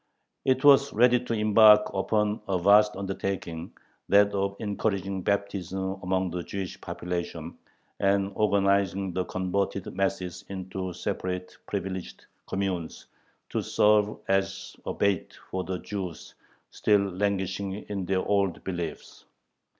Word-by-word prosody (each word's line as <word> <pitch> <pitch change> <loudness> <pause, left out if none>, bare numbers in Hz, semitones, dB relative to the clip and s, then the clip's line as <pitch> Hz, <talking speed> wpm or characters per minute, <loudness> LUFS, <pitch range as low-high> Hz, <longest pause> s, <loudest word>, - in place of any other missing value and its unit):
It 130 +1 +2
was 140 -1 +7
ready 125 +2 +5
to 120 - -3
embark 105 0 +6
upon 105 +2 0
a 95 -2 +1
vast 105 +3 +5
undertaking, 95 -3 -4 0.4
that 100 0 +6
of 100 0 -1
encouraging 100 -3 -2
baptism 95 -1 -2
among 95 -1 0
the 90 +1 -3
Jewish 95 +1 -6
population, 85 -1 -5 0.4
and 100 0 +2
organizing 100 -2 +2
the 90 0 -1
converted 95 +1 -2
masses 95 -2 -2
into 95 -1 -5
separate, 90 +1 -4
privileged 95 -1 -5 0.2
communes, 95 -4 -3 0.5
to - - 0
serve 105 0 +3
as 95 0 -1
a - - -1
bait 100 -3 0
for 95 0 -2
the 95 0 -3
Jews 95 -4 -6 0.4
still 105 -1 +3
languishing 95 0 -1
in 100 -2 -5
their 95 0 0
old 100 -3 +1
beliefs. 85 -4 -6
95 Hz, 120 wpm, -27 LUFS, 95-100 Hz, 0.5 s, was